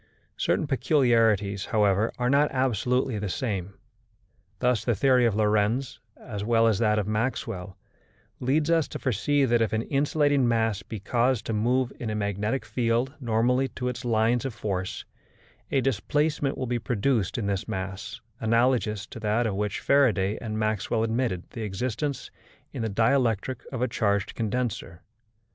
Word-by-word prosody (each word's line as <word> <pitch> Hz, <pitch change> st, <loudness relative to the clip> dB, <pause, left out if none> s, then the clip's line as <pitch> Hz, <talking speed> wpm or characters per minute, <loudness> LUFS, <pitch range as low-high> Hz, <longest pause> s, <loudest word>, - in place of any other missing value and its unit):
Certain -, -, 0 dB
peculiarities, 115 Hz, -, +2 dB
however, 105 Hz, 0 st, +2 dB
are 125 Hz, -, 0 dB
not 140 Hz, +3 st, +4 dB
absolutely 125 Hz, -1 st, 0 dB
the 100 Hz, -1 st, -3 dB
same. 100 Hz, -2 st, -3 dB, 0.8 s
Thus 125 Hz, 0 st, +1 dB
the 120 Hz, -1 st, +1 dB
theory 125 Hz, +2 st, +4 dB
of 110 Hz, -, 0 dB
Lorentz, 110 Hz, +5 st, +1 dB, 0.2 s
as 105 Hz, -3 st, -6 dB
well 115 Hz, +1 st, +3 dB
as 110 Hz, -4 st, +2 dB
that 110 Hz, -2 st, +2 dB
of 105 Hz, -, 0 dB
Maxwell, 105 Hz, -4 st, -3 dB, 0.6 s
leads 150 Hz, +5 st, +1 dB
us 165 Hz, -3 st, +3 dB
to -, -, -6 dB
foresee 135 Hz, +4 st, +1 dB
that 120 Hz, -2 st, +2 dB
if 110 Hz, -, 0 dB
an 110 Hz, +1 st, 0 dB
insulating 145 Hz, -1 st, +2 dB
mass 110 Hz, -4 st, +1 dB
be 105 Hz, +3 st, -7 dB
caused 120 Hz, +4 st, +1 dB
to 115 Hz, -, -2 dB
move 125 Hz, +4 st, +1 dB
in 115 Hz, -, -3 dB
a 110 Hz, -, -2 dB
magnetic 105 Hz, +4 st, -1 dB
field 115 Hz, +4 st, 0 dB
normally 125 Hz, +2 st, +1 dB
to 125 Hz, -1 st, -4 dB
its 125 Hz, -1 st, -5 dB
lines 115 Hz, 0 st, +2 dB
of 135 Hz, -5 st, -4 dB
force, 95 Hz, -3 st, -3 dB, 0.6 s
a 135 Hz, -, +2 dB
displacement 140 Hz, +4 st, 0 dB
will 130 Hz, -, -2 dB
be 120 Hz, 0 st, -1 dB
produced 115 Hz, -3 st, 0 dB
in 115 Hz, -, -2 dB
this 100 Hz, -1 st, -2 dB
mass 95 Hz, +1 st, -5 dB, 0.2 s
analogous 115 Hz, -3 st, +1 dB
to 115 Hz, -, -10 dB
that 110 Hz, +2 st, +1 dB
of 110 Hz, -, 0 dB
which 105 Hz, 0 st, -2 dB
Faraday 110 Hz, -8 st, +3 dB
and 110 Hz, -2 st, -4 dB
Maxwell 110 Hz, +1 st, 0 dB
admitted 115 Hz, -5 st, -1 dB
the 115 Hz, -, -6 dB
existence 120 Hz, +7 st, -3 dB, 0.4 s
in -, -, -4 dB
the 110 Hz, -, -1 dB
dielectric 115 Hz, +2 st, +1 dB
of 125 Hz, -2 st, -2 dB
a -, -, +2 dB
charged 100 Hz, -3 st, 0 dB
condenser. 110 Hz, -6 st, -3 dB
115 Hz, 160 wpm, -26 LUFS, 105-130 Hz, 0.8 s, not